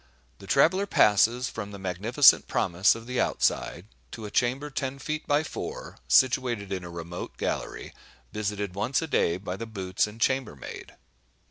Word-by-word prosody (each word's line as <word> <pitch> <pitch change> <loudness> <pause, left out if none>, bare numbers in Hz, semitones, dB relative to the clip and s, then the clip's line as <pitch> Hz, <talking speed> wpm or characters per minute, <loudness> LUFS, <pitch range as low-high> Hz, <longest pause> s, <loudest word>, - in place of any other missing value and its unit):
The 100 - -12
traveller 185 - +3
passes 115 - +4
from 105 -5 -6
the 100 - -9
magnificent 100 - +4
promise 90 +4 +2
of 115 0 -9
the 125 +1 -1
outside, 85 - 0 0.2
to 110 - -8
a 105 - -7
chamber 130 +4 0
ten 135 0 -3
feet 155 +2 -5
by 145 +1 +2
four, - - -7
situated 120 -6 +2
in 95 -2 -4
a 90 - -8
remote 85 +1 -7
gallery, - - -4 0.4
visited 105 -2 -3
once 130 - 0
a - - -4
day 85 - +1
by 95 0 -6
the 115 - -6
"boots" 95 -3 -1
and 105 +2 -11
chambermaid. 130 - -3
110 Hz, 160 wpm, -27 LUFS, 95-130 Hz, 0.4 s, passes